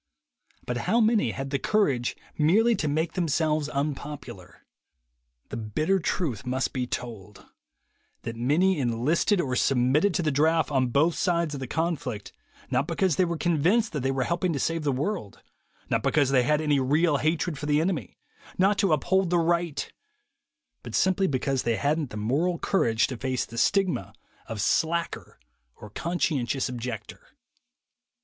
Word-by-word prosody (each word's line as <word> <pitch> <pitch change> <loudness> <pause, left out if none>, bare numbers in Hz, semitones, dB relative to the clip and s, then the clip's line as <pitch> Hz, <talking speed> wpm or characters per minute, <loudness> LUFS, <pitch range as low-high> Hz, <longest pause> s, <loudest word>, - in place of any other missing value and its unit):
But 125 - -2
how 235 - +4
many 220 - +3
had 135 +4 -5
the 140 - 0
courage 140 - +1 0.2
merely 215 +10 +3
to 160 -6 -2
make 155 +3 -1
them 180 -3 -1
selves 155 -1 0
unpopular? 145 0 -5 0.8
The - - -5
bitter 155 - 0
truth 150 - -2
must 130 +1 -2
be 125 -2 -2
told: 105 -6 -7 0.8
that 115 0 -5
many 155 +9 +2
enlisted 135 - +1
or 130 -7 -1
submitted 135 +10 +2
to 175 - +1
the 155 - +1
draft 160 +3 +2
on 130 -2 +2
both 145 +8 +2
sides 170 -4 0
of 140 - -4
the 130 - -5
conflict 140 -9 -3 0.4
not - - +1
because 185 -6 +1
they 185 - +4
were 170 -1 -2
con 165 -2 0
vinced 215 +7 +3
that 150 - -3
they 135 +1 -1
were 135 -1 0
helping 170 +4 0
to 140 - -2
save 165 +4 -1
the 145 -2 0
world, 140 - -3 0.4
not - - 0
because 145 -4 +2
they 130 -2 +4
had 150 +4 +1
any 150 -2 +2
real 145 +4 +2
hatred 155 0 -1
for 145 - -5
the 150 0 +3
enemy, 170 0 -2 0.4
not 195 +2 +3
to 195 -6 +3
uphold 190 +4 +1
the 175 - +2
right, 170 -2 0 0.9
but - - -7
simply 190 +1 +2
that 135 -2 0
they 115 -1 +1
hadn't 145 +2 0
the 105 - -7
moral 145 +12 0
courage 115 - +1
to 130 - -5
face 130 0 -2
the 115 - -12
stigma 185 - +1 0.3
of 115 -2 -5
"slacker" 170 - -1 0.4
or 105 - -12
"conscientious 140 -6 -1
objector." 120 -3 -6
150 Hz, 165 wpm, -26 LUFS, 130-170 Hz, 0.9 s, how